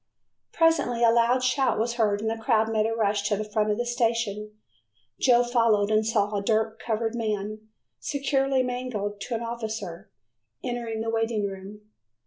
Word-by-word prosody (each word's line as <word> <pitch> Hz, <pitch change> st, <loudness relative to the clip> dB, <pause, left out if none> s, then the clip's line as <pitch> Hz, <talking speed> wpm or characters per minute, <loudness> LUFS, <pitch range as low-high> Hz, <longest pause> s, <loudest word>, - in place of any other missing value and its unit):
Presently 300 Hz, -8 st, +2 dB
a 230 Hz, -, +6 dB
loud 235 Hz, +2 st, +3 dB
shout 255 Hz, -1 st, +2 dB
was 235 Hz, +2 st, 0 dB
heard 210 Hz, -4 st, +1 dB
and 220 Hz, -, -1 dB
the 225 Hz, 0 st, -5 dB
crowd 225 Hz, -2 st, +2 dB
made 215 Hz, 0 st, +2 dB
a 225 Hz, -, -2 dB
rush 205 Hz, -2 st, +1 dB
to 205 Hz, -, +1 dB
the 215 Hz, -, -2 dB
front 210 Hz, 0 st, 0 dB
of 210 Hz, -, +1 dB
the 240 Hz, -, -1 dB
station. 230 Hz, -3 st, -1 dB, 0.7 s
Joe 245 Hz, -2 st, +5 dB
followed 230 Hz, -4 st, +2 dB
and 215 Hz, 0 st, +3 dB
saw 210 Hz, -2 st, 0 dB
a 200 Hz, -, 0 dB
dirt 220 Hz, +1 st, 0 dB
covered 225 Hz, 0 st, -2 dB
man, 215 Hz, -1 st, -3 dB, 0.3 s
securely 275 Hz, -2 st, 0 dB
manacled 245 Hz, -5 st, -4 dB
to 235 Hz, -, -3 dB
an 225 Hz, -, -3 dB
officer, 220 Hz, -7 st, -5 dB, 0.5 s
entering 235 Hz, -2 st, -3 dB
the 225 Hz, 0 st, -2 dB
waiting 225 Hz, -2 st, 0 dB
room. 195 Hz, +1 st, -7 dB
225 Hz, 170 wpm, -26 LUFS, 210-240 Hz, 0.7 s, a